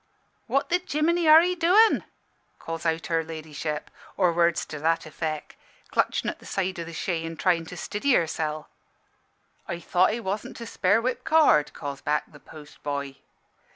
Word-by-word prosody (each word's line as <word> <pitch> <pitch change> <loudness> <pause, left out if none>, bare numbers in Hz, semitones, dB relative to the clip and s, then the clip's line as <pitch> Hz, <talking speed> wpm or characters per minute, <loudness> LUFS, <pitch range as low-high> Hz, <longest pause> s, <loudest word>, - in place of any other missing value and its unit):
"'What 275 +7 0
the 355 +1 +2
jiminy 335 +1 +1
are 315 +2 +9
'ee 360 +1 +1
doin?' 365 +6 +4 0.5
calls 165 0 -5
out 160 0 -1
her 165 -1 0
ladyship 155 -1 -5 0.3
or 180 -3 +3
words 170 0 +2
to 150 - -7
that 165 +2 +1
effec' 155 -1 -5 0.4
clutchin' - - +1
at - - -3
the - - -16
side 190 -2 -2
o' - - -3
the 165 - -9
shay, 165 0 -2
an' 165 0 -6
tryin' 170 -3 +1
to 180 - -9
stiddy 210 +9 0
hersel'. 155 -4 -1 1.0
"'I 170 - -4
thought 180 +1 +3
I 230 - -2
wasn' 205 -1 -4
to 235 - -7
spare 205 +1 +1
whip 255 0 -2
cord,' 315 - +4
calls 140 -2 -6
back 150 0 -1
the 145 - -14
post 150 -1 -14
boy. 140 -1 -4
170 Hz, 175 wpm, -26 LUFS, 155-235 Hz, 1.0 s, are